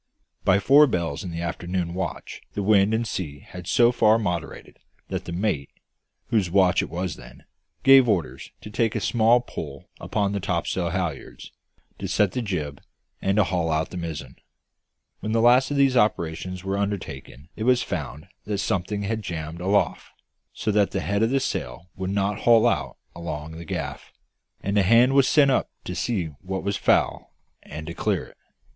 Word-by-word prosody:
By 95 -1 +4
four 140 +9 +6
bells 85 - -2
in 90 - -5
the 85 0 -5
afternoon 85 +1 -3
watch 85 -5 -5
the 100 - -2
wind 100 0 +4
and 115 +1 0
sea 85 -9 -4
had 90 -1 -10
so 120 +5 +4
far 110 -2 +4
moderated 90 -7 -4 0.3
that - - -4
the - - -6
mate, 85 -6 -1 0.6
whose 105 -6 +1
watch 95 0 +4
it - - -4
then - - -18
was, 90 -3 -3 0.6
gave 135 -2 +7
orders 80 - -1
to 105 - -9
take 115 +1 0
a - - +1
small 120 +1 +3
pull 120 - -8
upon 100 -2 -1
the 100 - -2
topsail 90 -2 -1
halliards, 85 -5 -4 0.5
to - - -4
set 105 -3 +2
the 125 - -2
jib, 75 - -4 0.4
and 95 0 +1
to 105 - +6
haul 90 -2 -1
out 80 0 0
the 90 - -6
mizzen. 75 -6 -6 0.8
When 110 +1 -3
the 115 - +3
last 125 +3 +5
of 145 - -1
these 135 -2 +4
operations 90 -4 0
were 95 +1 -2
undertaken 80 -8 -5
it 110 - -4
was 125 -1 +4
found 75 -3 -5 0.2
that 105 -1 -2
something 100 +2 -1
had 110 +2 -2
jammed 85 -3 -5
aloft, 100 +3 +1 0.4
so 110 - -2
that 105 -1 +3
the 95 - -2
head 100 +1 -1
of 115 - +3
the 135 +2 +2
sail 85 - -4
would 95 0 -4
not 100 +1 0
haul 115 -2 +5
out - - 0 0.2
along 80 -2 -5
the 85 +1 -9
gaff; - - -5 0.5
and 100 +1 +1
a - - +5
hand 115 +7 +5
was 135 -1 +5
sent 140 -3 +5
up - - +1
to 90 - -5
see 95 +1 -1 0.2
what 95 0 -4
was 100 0 -1
foul, - - +1 0.3
and 75 +1 -8
to 85 - -6
clear - - -1
it. - - -19
95 Hz, 185 wpm, -24 LUFS, 85-110 Hz, 0.8 s, gave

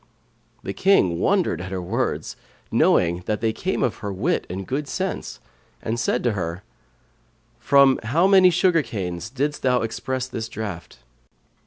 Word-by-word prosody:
The - - -4
Just - - -15
King 95 - +4
wondered 190 - +1
at 90 - -6
her 95 - -3
words, 90 - -2 0.4
knowing 85 0 +3
that 105 0 0
they 110 -1 0
came - - -2
of - - 0
her 100 - -5
wit 130 - -1
and 95 +2 -5
good 140 +6 -3
sense, - - -4 0.4
and 115 +2 -3
said 120 +1 0
to 120 - +2
her, 90 -3 -4 1.0
"From 140 -1 +5
how 145 +11 +2
many 190 -2 +6
sugar 175 -1 +3
canes 95 - -5
didst 145 +4 -2
thou 125 -2 +2
express 130 +3 -3
this 115 -3 -5
draught?" 100 -7 -7
115 Hz, 160 wpm, -23 LUFS, 95-145 Hz, 1.0 s, many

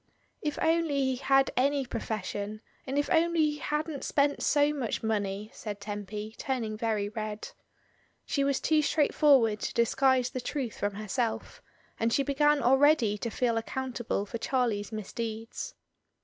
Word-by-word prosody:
"If 300 -1 -2
only 325 -3 +2
he 260 -1 +1
had 270 +1 +3
any 275 +1 +2
profession, 215 -2 -4 0.3
and 270 +2 -2
if 290 - +1
only 335 0 +3
he 295 - -6
hadn't 300 -1 -2
spent 285 0 +1
so 290 0 +3
much 255 -7 -3
money," 210 -1 -2
said 205 -2 -6
Tempy, 210 +1 -6
turning 235 -5 -2
very 215 -2 -1
red. 215 0 -5 0.8
She 280 - 0
was 275 -1 +1
too 310 -1 +3
straightforward 280 -7 +3
to - - -4
disguise 255 +2 +3
the 255 - -4
truth 250 -2 -4
from 205 -1 -1
herself, 220 +3 -3 0.4
and 230 +1 +1
she 275 +3 +2
began 290 0 +2
already 265 -3 +4
to 235 - -2
feel 235 0 0
accountable 240 -3 -2
for 230 +3 -6
Charlie's 230 -5 0
misdeeds. 225 - -5
245 Hz, 150 wpm, -29 LUFS, 215-285 Hz, 0.8 s, already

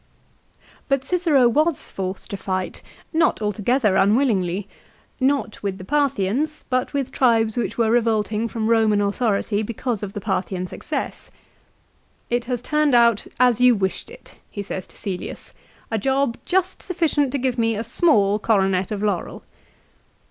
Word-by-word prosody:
But 275 -1 +1
Cicero 310 -5 +3
was 305 +5 +1
forced 190 +3 -5
to - - -2
fight, 185 -1 -3 0.3
not 320 0 +2
altogether 210 +1 +1
unwillingly, 200 -4 +2 0.5
not 265 -4 0
with 195 -2 -3
the 185 - -9
Parthians, 280 +2 0
but 255 0 0
with 275 -2 -2
tribes 225 -5 +2
which 240 - -2
were 225 -2 +2
revolt 225 -3 +2
ing 220 +2 -1
from 220 -1 -3
Roman 220 -2 +3
authority 205 0 0
because 230 0 -3
of 200 -2 -5
the - - -4
Parthian 190 -2 -2
success. - - -5 1.0
"It 240 0 0
has 245 -1 -3
turned 300 -2 +2
out 235 -3 +4
as 245 -2 +4
you 250 -1 +6
wished 190 -2 -2
it," - - -15
he 205 - -5
says 190 -2 -6
to - - -17
Cselius, 190 -3 -6 0.2
" - - -31
a 220 - 0
job 265 +1 +1
just 375 0 0
sufficient 315 -6 0
to - - +1
give 255 -2 -1
me 225 -1 +2
a 215 - -3
small 215 - +3
coronet 195 -4 +1
of 210 -1 -3
laurel." 200 -4 -2
230 Hz, 155 wpm, -22 LUFS, 205-265 Hz, 1.0 s, you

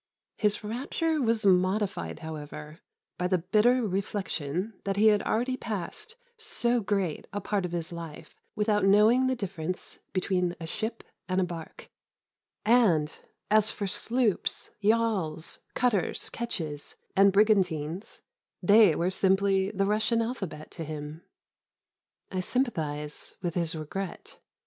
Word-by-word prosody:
His 210 0 +1
rapture 285 +8 -1
was 230 -3 +1
modified 185 - +1
however, 150 0 -7 0.4
by 180 - +1
the 185 0 +2
bitter 220 +8 +3
reflection 190 -1 -2
that 195 0 -1
he 215 +2 +6
had 210 -1 +3
already 250 +3 0
passed 235 - -5 0.2
so 245 - +1
great 195 -6 -1
a 205 - -2
part 205 -2 -1
of 175 - -4
his 170 0 -3
life 165 -3 -8 0.2
without 210 0 +2
knowing 215 +6 +5
the 260 - +1
difference 180 -5 -4
between 180 -2 0
a 165 - -5
ship 220 +7 -3 0.3
and 185 +1 +1
a - - +3
barque; 170 -2 -7 0.8
and, 195 -10 +4 0.4
as 215 0 +5
for 205 - -3
sloops, 230 +2 0
yawls, 205 -7 0 0.2
cutters, 225 -9 +1
ketches, 160 -11 -4 0.2
and 195 +1 +6
brigantines, 185 -4 +1 0.4
they 200 -2 +6
were 175 +4 0
simply 195 0 +2
the 195 -1 0
Russian 215 +3 +2
alphabet 205 -10 -4
to 165 - -6
him. 155 +1 -6 1.1
I 185 - -2
sympathise 160 - -1
with 175 -2 -1
his 170 -1 -1
regret. 170 +5 -6
195 Hz, 130 wpm, -28 LUFS, 170-220 Hz, 1.1 s, he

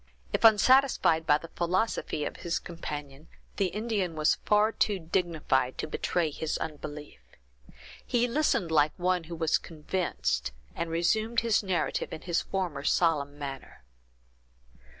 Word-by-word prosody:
If - - 0
unsatisfied 220 -7 +5
by 150 - +5
the 165 +2 -11
philosophy 175 -3 -1
of - - -5
his 170 -1 -2
companion, 150 -3 -7 0.3
the 195 - +2
Indian 205 -3 -2
was 155 0 +2
far 210 +1 +4
too 210 -2 +1
dignified 160 -7 0
to - - -2
betray 160 +1 -1
his 160 +2 -3
unbelief. 150 - -7 0.8
He 240 0 +1
listened 235 - +1
like 150 -1 +3
one 180 -1 0
who 170 +1 -7
was 160 -1 +1
convinced, 150 - -2 0.2
and 170 - -3
resumed 215 +8 +1
his 230 -2 +2
narrative 190 -4 -1
in - - -6
his 175 -1 0
former 175 -7 -3
solemn 145 -3 +1
manner. 135 - -8
170 Hz, 135 wpm, -29 LUFS, 150-195 Hz, 0.8 s, unsatisfied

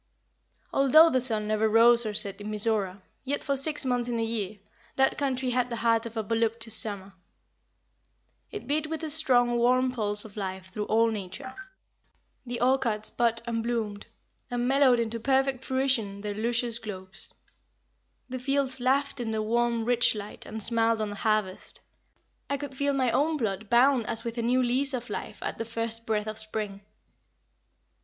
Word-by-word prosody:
Although 310 +5 +6
the 255 - +1
sun 220 -4 -1
never 215 +1 +1
rose 235 +1 +5
or 210 - -5
set 200 -1 -1
in 205 - -6
Mizora, 205 -3 0 0.2
yet 280 +2 -3
for 280 - -1
six 295 +1 +1
months 245 -1 -1
in 235 - -2
a 225 - -1
year, 215 -3 -3 0.4
that 265 0 +2
country 260 -2 -2
had 250 0 0
the 235 - -4
heart 230 0 +1
of 230 0 -10
a 220 - -1
voluptuous 225 0 -1
summer. 200 -3 +3 1.4
It 420 - -8
beat 305 +2 -1
with 320 +1 -5
a 310 - -1
strong, 245 -6 +3
warm 255 +2 +2
pulse 210 -4 +7
of 210 - -12
life 190 -2 -6
through 210 +2 -4
all 225 +1 +2
nature. 220 +6 -7 0.9
The 240 0 -4
orchards 245 -4 +1
budded 230 -1 0
and 230 -1 -2
bloomed, 225 -3 -4 0.4
and 245 -1 -2
mellowed 265 -2 +4
into 230 0 -2
perfect 265 +1 0
fruition 260 -7 -1
their 210 0 -4
luscious 235 +2 -1
globes. 190 -3 -8 0.9
The 255 0 -6
fields 270 0 -1
laughed 275 +2 0
in 235 -2 -3
the 220 -1 -2
warm, 235 +1 0
rich 240 -1 +3
light, 205 0 -7
and 220 -1 -2
smiled 230 0 +4
on 215 -1 -2
the - - -7
harvest. 215 -3 -1 0.7
I 280 - -1
could 280 -1 -7
feel 280 +1 0
my 260 -3 +1
own 310 +5 +1
blood 210 -4 -3
bound 245 0 +3
as 225 0 +4
with 235 0 -5
a - - 0
new 250 +2 +1
lease 260 +3 0
of 245 0 -7
life - - -6
at - - -5
the - - -1
first 230 0 -4
breath 210 -1 -1
of 215 0 -5
spring. 215 -2 -5
235 Hz, 180 wpm, -27 LUFS, 215-255 Hz, 1.4 s, pulse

